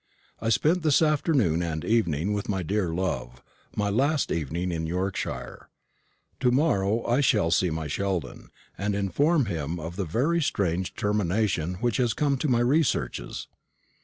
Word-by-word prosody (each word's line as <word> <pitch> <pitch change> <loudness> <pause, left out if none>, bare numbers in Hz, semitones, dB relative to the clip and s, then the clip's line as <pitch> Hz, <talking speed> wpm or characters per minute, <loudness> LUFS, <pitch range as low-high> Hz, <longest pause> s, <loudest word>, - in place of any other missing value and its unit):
I 110 - 0
spent 160 +10 +2
this 155 0 +4
afternoon 140 - +2
and 80 -2 -3
evening 100 -5 +1
with 105 0 -3
my 95 -3 -1
dear 95 0 0
love 75 -9 -3 0.3
my 105 -1 0
last 140 +7 +1
evening 85 +3 -2
in 80 -1 -2
Yorkshire. 90 +3 -4 0.7
To 125 - +3
morrow 115 -6 +1
I 125 +4 +2
shall 105 -10 +2
see 90 +2 +3
my 80 0 -3
Sheldon, 90 0 -3 0.3
and 100 +1 -2
inform 140 - +2
him 85 -3 -3
of 80 +3 -6
the 100 - -1
very 140 - +1
strange 95 - -1
termination 100 -4 0
which 120 +4 0
has 120 -3 +1
come 140 -2 +1
to 155 - 0
my 120 -3 +3
researches. 140 +5 0
100 Hz, 155 wpm, -26 LUFS, 85-125 Hz, 0.7 s, this